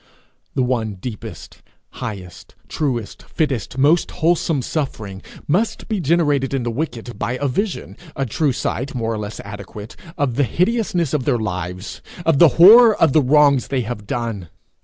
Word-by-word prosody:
The 130 - +2
one 115 -5 -1
deepest, 105 +3 -9 0.3
highest, 100 -8 -8
truest, 125 -9 -3
fittest, 135 -6 -3
most 150 +6 +3
wholesome 165 -4 0
suffering 110 -11 -4 0.3
must 215 +8 0
be 215 -3 -1
generated 145 -4 +1
in 130 - -1
the 120 - -2
wicked 120 -3 -5
by 110 +3 -1
a 140 +3 -1
vision, 195 - -3 0.2
a 135 - -1
true 140 +5 0
sight, 130 +2 -3
more 115 -2 -1
or 110 - -4
less 105 +1 -6
adequate, 105 +1 -9 0.2
of 140 -6 -1
the 145 - +3
hideousness 180 - 0
of 140 -5 0
their 130 -4 +2
lives, 90 -2 -5 0.2
of 160 -4 +3
the 170 - +9
horror 220 +6 +8
of 160 -5 +4
the 155 - +5
wrongs 140 -1 +4
they 135 -2 -1
have 110 -3 -6
done. 110 -8 -4
130 Hz, 160 wpm, -20 LUFS, 110-155 Hz, 0.3 s, the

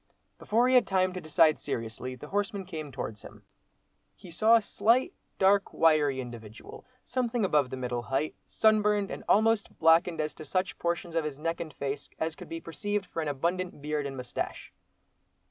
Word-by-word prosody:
Before 235 +4 +2
he 255 - +2
had 250 - +5
time 185 -1 +2
to 185 - -5
decide 155 0 +4
seriously, 115 +3 -4
the 150 +4 -11
horseman 200 0 -2
came 155 -5 -6
towards 110 -5 -6
him. - - -13 0.7
He 180 - -13
saw 220 +7 +5
a 230 - +5
slight, 250 - +2 0.2
dark, 195 +1 +3
wiry 150 -4 +3
individual, 115 -3 -9 0.2
something 245 -3 -1
above 150 -7 +2
the 130 - -5
middle 125 -1 -2
height, 135 +7 -1
sunburned, 210 -2 +2
and - - -6
almost 220 0 +3
blackened 165 +1 +4
as 155 0 -1
to 155 - -10
such 185 +5 -2
portions 170 0 -2
of 165 -1 +1
his 150 -3 -4
neck 165 +2 -2
and 160 -2 -5
face 140 0 -4
as 160 0 -2
could - - -11
be 165 - -4
perceived 200 +6 -3
for 165 - -4
an 155 - -3
abundant 170 +5 -2
beard 150 0 -2
and 135 -1 -7
moustache. 125 -1 -5
165 Hz, 180 wpm, -29 LUFS, 145-200 Hz, 0.7 s, had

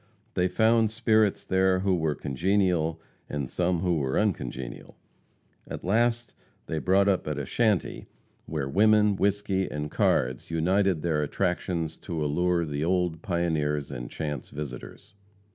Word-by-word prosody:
They 90 -1 +2
found 110 +2 +3
spirits 110 -2 +2
there 95 0 +2
who 95 -1 +2
were 80 -3 0
congenial 85 +2 0 0.3
and 70 -3 -3
some 90 +4 0
who 90 -3 +1
were 65 -3 -1
uncongenial. 65 - -3 0.7
At - - -7
last 120 +4 +1 0.3
they 80 - -3
brought 95 +4 +3
up 95 -5 +1
at 75 -2 -2
a 70 - -3
shanty 110 - 0 0.4
where 75 -4 -3
women, 105 +5 +4
whisky 100 -1 0
and 75 0 -4
cards 65 +1 +1
united 90 +1 +1
their 80 -3 +1
attractions 85 0 -2
to 80 -4 -4
allure 85 +3 +1
the 75 -1 -3
old 90 -2 0
pioneers 80 -6 -1
and - - -6
chance 75 -4 -5
visitors. 75 - -8
90 Hz, 140 wpm, -27 LUFS, 75-100 Hz, 0.7 s, women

